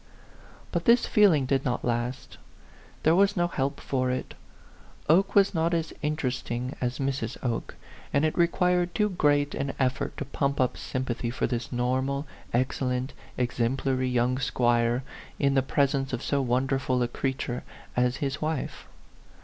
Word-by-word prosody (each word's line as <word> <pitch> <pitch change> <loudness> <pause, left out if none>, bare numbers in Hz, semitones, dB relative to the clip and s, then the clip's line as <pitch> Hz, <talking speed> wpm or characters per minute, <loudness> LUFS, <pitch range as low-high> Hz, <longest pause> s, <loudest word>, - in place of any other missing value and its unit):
But - - -1
this 235 -1 +5
feeling 180 -10 +4
did 135 0 +1
not 120 -2 -1
last. 120 +1 -3 0.6
There 160 - +5
was 200 +2 +3
no 175 0 +3
help 140 -5 -2
for 130 -2 -1
it; 130 0 -3 0.7
Oke 185 +6 +4
was 200 0 +5
not 165 0 +1
as 165 -1 -2
interesting 130 -4 -2
as 125 0 -1
Mrs. 135 -4 -2
Oke; 120 -3 -2 0.4
and 140 +2 +3
it 155 - 0
required 175 +1 +2
too 210 -1 +2
great 145 -5 +2
an 135 0 -2
ef 130 -1 +2
fort - - -4
to 145 - -3
pump 140 0 -1
up 130 -1 +2
sympathy 130 -2 -3
for 120 - -1
this 120 -1 -3
normal, 130 +3 0 0.3
excellent, 125 +1 0 0.2
exemplary 130 +1 0
young 125 +1 +1
squire, 120 -1 +2 0.3
in 140 -1 +2
the 135 - +4
presence 135 0 0
of 120 - -2
so 140 -1 +1
wonderful 130 0 +1
a - - +1
creature 130 0 -3 0.3
as 125 0 +2
his 140 +1 -3
wife. 155 -1 -3
135 Hz, 155 wpm, -27 LUFS, 125-150 Hz, 0.7 s, this